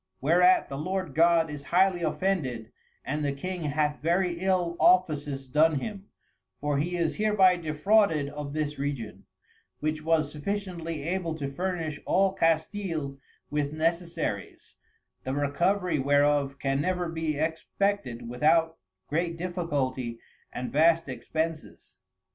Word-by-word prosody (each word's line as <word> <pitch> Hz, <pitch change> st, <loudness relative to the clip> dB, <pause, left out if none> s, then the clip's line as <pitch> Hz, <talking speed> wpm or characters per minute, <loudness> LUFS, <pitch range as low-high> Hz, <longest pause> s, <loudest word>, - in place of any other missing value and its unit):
Whereat 180 Hz, +6 st, +4 dB
the 135 Hz, -, -6 dB
Lord 185 Hz, -1 st, -3 dB
God 165 Hz, 0 st, +4 dB
is 145 Hz, -1 st, -7 dB
highly 180 Hz, +1 st, +3 dB
offended 150 Hz, -, -1 dB, 0.3 s
and 150 Hz, +3 st, -2 dB
the 145 Hz, -, +1 dB
King 180 Hz, +4 st, -5 dB
hath 150 Hz, 0 st, 0 dB
very 175 Hz, +2 st, +1 dB
ill 180 Hz, -2 st, +1 dB
Offices 150 Hz, -7 st, +2 dB
done 150 Hz, +3 st, +3 dB
him, 200 Hz, +3 st, -7 dB, 0.5 s
for 145 Hz, -1 st, 0 dB
he 175 Hz, +4 st, -1 dB
is 165 Hz, -2 st, -1 dB
hereby 205 Hz, -4 st, +4 dB
defrauded 160 Hz, 0 st, +2 dB
of 145 Hz, -1 st, -6 dB
this 150 Hz, -2 st, -2 dB
Region, 120 Hz, -9 st, -4 dB, 0.5 s
which 155 Hz, 0 st, -2 dB
was 155 Hz, -2 st, +1 dB
sufficiently 165 Hz, -2 st, -4 dB
able 170 Hz, 0 st, -2 dB
to 140 Hz, -3 st, -4 dB
furnish 165 Hz, -2 st, -3 dB
all 195 Hz, 0 st, +3 dB
Castile 160 Hz, -4 st, -1 dB, 0.3 s
with 145 Hz, 0 st, -1 dB
Necessaries, 165 Hz, -, -2 dB, 0.5 s
the 130 Hz, +1 st, -3 dB
Recovery 170 Hz, +4 st, +1 dB
whereof 145 Hz, 0 st, +2 dB
can 135 Hz, 0 st, 0 dB
never 180 Hz, +1 st, -1 dB
be 160 Hz, -2 st, -2 dB
expected 160 Hz, -4 st, -1 dB
without 160 Hz, +6 st, +2 dB, 0.3 s
great 165 Hz, +2 st, -1 dB
difficulty 145 Hz, -9 st, -2 dB, 0.3 s
and 125 Hz, -, -5 dB
vast 165 Hz, +2 st, +4 dB
Expenses. 155 Hz, +6 st, -5 dB
160 Hz, 125 wpm, -27 LUFS, 145-180 Hz, 0.5 s, Whereat